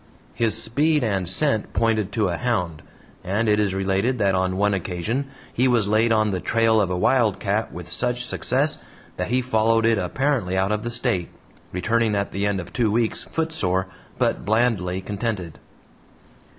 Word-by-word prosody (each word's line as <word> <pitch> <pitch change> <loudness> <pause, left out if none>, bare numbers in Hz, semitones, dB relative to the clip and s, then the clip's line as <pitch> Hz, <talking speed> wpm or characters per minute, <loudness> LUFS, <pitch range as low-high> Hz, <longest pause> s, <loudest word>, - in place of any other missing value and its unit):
His 115 0 +2
speed 150 +6 +1
and 95 -6 -1
scent 125 +1 +1
pointed 110 -3 +1
to 110 -5 +1
a 85 - -2
"hound," 90 -10 -1 0.4
and 100 +5 0
it 105 0 +3
is 100 -2 0
related 95 +6 0
that 100 -3 +2
on 95 0 0
one 105 +1 +2
occasion 95 +9 -2 0.3
he 125 +2 +2
was 120 -5 +2
laid 110 +2 +2
on 110 -1 +2
the 95 - -1
trail 115 +1 +2
of 95 - 0
a 90 - -1
wildcat 110 -1 +1
with 90 0 -9
such 125 +7 0
success 140 +4 0 0.4
that - - -2
he 125 +1 +1
followed 115 -1 +2
it 115 -2 +3
apparently 100 -1 0
out 95 +2 +1
of 105 0 0
the 120 - -4
State, 95 -7 -1 0.4
returning 110 +4 +1
at 100 0 -1
the 100 +1 -1
end 100 -1 0
of 90 - -8
two 115 -4 +1
weeks 115 0 0
footsore, 100 - -1 0.3
but - - 0
blandly 100 -4 +1
contented. 100 -4 -4
110 Hz, 175 wpm, -23 LUFS, 95-120 Hz, 0.4 s, it